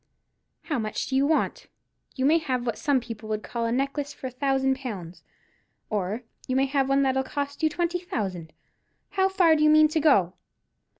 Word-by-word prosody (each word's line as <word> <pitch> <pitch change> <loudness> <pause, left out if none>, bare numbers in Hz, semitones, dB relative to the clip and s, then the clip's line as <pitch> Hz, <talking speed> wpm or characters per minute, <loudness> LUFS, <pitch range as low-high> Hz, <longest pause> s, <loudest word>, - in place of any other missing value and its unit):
"How 295 -6 -2
much 215 -1 -3
do 265 - -3
you 275 +1 +3
want? 315 - 0 0.5
You 260 - 0
may 320 +4 +5
have 255 -5 -2
what 235 -3 -2
some 285 -3 +2
people 230 -2 -8
would 215 0 -2
call 235 -1 -3
a - - -1
necklace 275 +3 -1
for - - -10
a 255 - -3
thousand 265 0 +1
pounds, 195 -10 -7 0.7
or 210 +3 -2 0.2
you 255 - -1
may 270 +1 +3
have 270 -1 0
one 275 0 +3
that'll 265 0 +2
cost 285 +1 -4
you 315 - +3
twenty 345 +2 -1
thousand. 190 - -4 0.6
How 380 -1 +2
far 360 -4 +4
do 300 - 0
you 305 - +6
mean 310 0 +6
to 315 - 0
go?" 205 - +4
270 Hz, 195 wpm, -26 LUFS, 230-300 Hz, 0.7 s, you